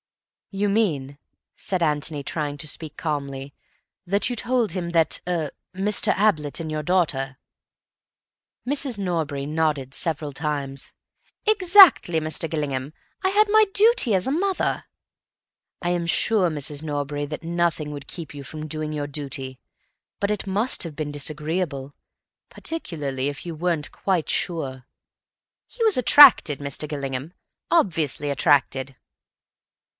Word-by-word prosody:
"You 200 +1 -1
mean," 155 -10 0 0.4
said 185 -3 -1
Antony, 150 -1 0
trying 145 -1 -3
to 155 - -4
speak 155 0 -5
calmly, 140 -3 -4 0.5
"that 200 +5 +1
you 245 - -2
told 240 -2 0
him 175 -1 -3
that—er—Mr. 175 +4 0
Ablett 155 -9 +1
and 160 -1 -5
your 155 0 -3
daughter—?" 145 -7 0 1.3
Mrs. 270 -4 -2
Norbury 160 -7 -2
nodded 150 -3 -1
several 155 -2 -2
times. 140 -2 -4 0.5
"Exactly, 375 - +6
Mr. 155 +1 -2
Gillingham. 140 -3 -3 0.3
I 380 - +3
had 415 +2 +4
my 435 +1 +5
duty 430 - +4
as 185 - +2
a - - 0
mother." 380 +5 0 1.0
"I 175 - 0
am 175 -1 -1
sure, 190 +1 +3
Mrs. 145 -1 -4
Norbury, 145 -1 -3
that 150 +3 -6
nothing 170 -3 -1
would 145 -1 -8
keep 160 -4 -8
you 140 -1 -8
from 155 +3 -7
doing 155 0 -4
your 145 -1 -3
duty. 135 -3 -4 0.6
But 200 +1 0
it 210 -1 -3
must 210 +6 0
have 165 -4 -7
been 150 -1 -4
disagreeable. 150 -1 -3 0.6
Particularly 145 - -4
if 145 +3 -8
you 170 -2 -5
weren't 165 -2 -1
quite 185 -5 -1
sure—" 135 -7 -2 0.8
"He - - -12
was 435 - +4
attracted, 255 - +7
Mr. 145 +1 -3
Gillingham. 140 +1 -4 0.4
Obviously 160 - +1
attracted." 140 -3 +1
155 Hz, 130 wpm, -23 LUFS, 145-190 Hz, 1.3 s, attracted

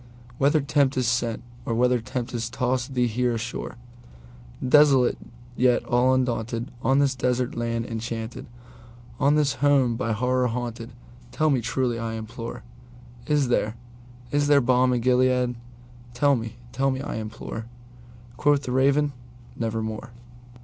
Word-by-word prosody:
Whether 145 +3 +3
Tempter 140 -2 +1
sent, 115 -1 0 0.2
or 115 - -2
whether 125 +1 +3
tempest 120 -1 -4
tossed 130 +1 -1
thee 125 -1 +3
here 120 +1 0
ashore, 115 +2 -5 0.9
Desolate 135 -3 +5 0.4
yet 125 0 +2
all 125 +1 +3
undaunted, 120 -1 -2
on 135 +1 +2
this 140 -1 +3
desert 125 -1 -1
land 115 -1 -2
enchanted—On 120 +3 -4
this 150 -2 +2
home 140 -5 +3
by 115 0 -1
Horror 125 +3 +1
haunted—tell 120 +5 -4
me 130 -3 +2
truly, 120 0 -1
I 115 -1 -3
implore:Is 120 - -5
there—is 120 +4 -3
there 145 -1 +6
balm 125 0 +3
in 125 -1 +1
Gilead?—tell 125 +1 0
me—tell 120 +3 -3
me, 130 -1 -2
I 145 - -4
implore!"Quoth 120 +4 -4
the 125 - -4
Raven, 140 +3 +2 0.4
"Nevermore." 110 -1 -3
120 Hz, 115 wpm, -25 LUFS, 115-130 Hz, 0.9 s, there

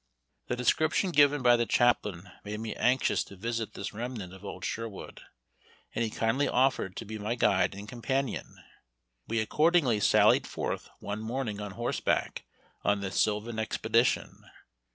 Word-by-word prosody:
The 125 - -1
description 155 - +2
given 145 -3 +4
by 120 -1 +7
the 120 -1 0
chaplain 100 -7 +1
made 105 +1 -5
me 110 -1 -4
anxious 125 +1 +2
to 100 - -12
visit 115 +3 -3
this 100 - -5
remnant 110 -5 -5
of 95 +1 -13
old 95 -2 -6
Sherwood, 115 -3 -6 0.7
and - - 0
he 115 - -1
kindly 115 +6 +1
offered 125 -7 +1
to 115 - -5
be 110 +1 -6
my 105 +3 -2
guide 100 -5 +2
and 100 +1 -8
companion. 130 +3 -3 0.7
We 115 0 0
accordingly 150 0 +3
sallied - - +4
forth - - -4
one 100 +1 -4
morning 110 -2 -3
on 105 -2 -6
horseback 120 +3 -1 0.4
on 100 0 +2
this 95 -1 0
sylvan 110 +2 -1
expedition. 110 +2 0
115 Hz, 155 wpm, -29 LUFS, 105-125 Hz, 0.7 s, by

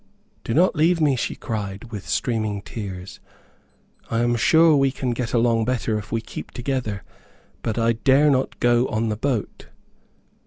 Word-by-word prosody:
"Do 115 - -2
not 180 +3 +4
leave 165 +3 +3
me," 145 -4 +3
she 125 - -2
cried, 105 0 -5
with 105 -4 -7
streaming 110 -4 -1
tears. 95 -4 -7 0.9
"I 115 0 0
am 120 0 +2
sure 160 +6 +5
we 135 -1 +3
can 130 -1 -3
get 120 -1 -3
along 115 -1 +2
better 120 -3 -1
if 105 +1 -11
we 115 - 0
keep - - -8
together, 125 -6 -3 0.6
but 110 - -3
I 115 0 +2
dare 135 +5 +4
not 130 -1 -1
go 120 +1 +3
on 110 +1 -1
the 105 - -1
boat." 120 -1 -3
120 Hz, 165 wpm, -23 LUFS, 110-130 Hz, 0.9 s, sure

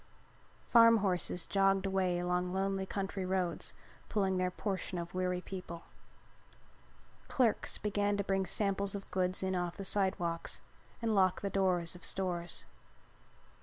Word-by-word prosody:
Farm 230 -1 +7
horses 180 -3 0
jogged 195 0 +2
away 190 -2 +1
along 180 +1 -1
lonely 195 0 -1
country 195 -1 -3
roads 185 -2 0 0.3
pulling 195 -3 +1
their 185 0 +1
portion 185 -1 -3
of 170 0 -5
weary 180 0 -1
people. 180 -3 -7 1.4
Clerks 240 -5 +1
began 205 -1 0
to 200 - 0
bring 195 -1 0
samples 200 -1 0
of 195 - -8
goods 185 0 0
in 190 0 0
off 175 -1 -2
the 195 - -5
sidewalks 175 -4 0 0.4
and 225 -1 +1
lock 185 -2 +3
the 200 - -2
doors 180 -3 +1
of 180 - -12
stores. 175 -3 -2
190 Hz, 135 wpm, -33 LUFS, 180-195 Hz, 1.4 s, Farm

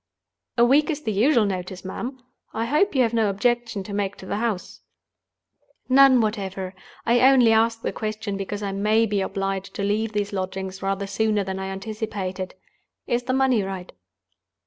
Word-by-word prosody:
"A 235 - +6
week 285 +6 +4
is 300 -1 -2
the 220 - -1
usual 230 +3 +3
notice, 185 -1 -4
ma'am. 245 +7 -5 0.4
I 225 - 0
hope 300 - +2
you 260 - +5
have 230 -1 0
no 225 -3 +2
objection 225 +1 0
to 200 - -8
make 200 -1 -1
to - - -12
the 200 - -2
house?" 215 -5 -3 1.1
"None 265 -1 +7
whatever. 195 -3 -3 0.3
I 240 +1 +4
only 255 -3 +6
ask 225 +1 +2
the - - -1
question, 215 -1 -3
because 200 +1 -4
I 200 - -2
may 215 +3 +2
be 205 -2 0
obliged 195 0 -3
to 200 - -2
leave 215 +2 0
these 205 -1 -2
lodgings 190 0 -4
rather 195 0 -1
sooner 210 0 0
than 190 0 -4
I 190 - -4
anticipated. 195 -2 -4 0.5
Is 240 0 -1
the 255 - 0
money 260 -4 +3
right?" 190 -2 -5
210 Hz, 175 wpm, -24 LUFS, 195-235 Hz, 1.1 s, None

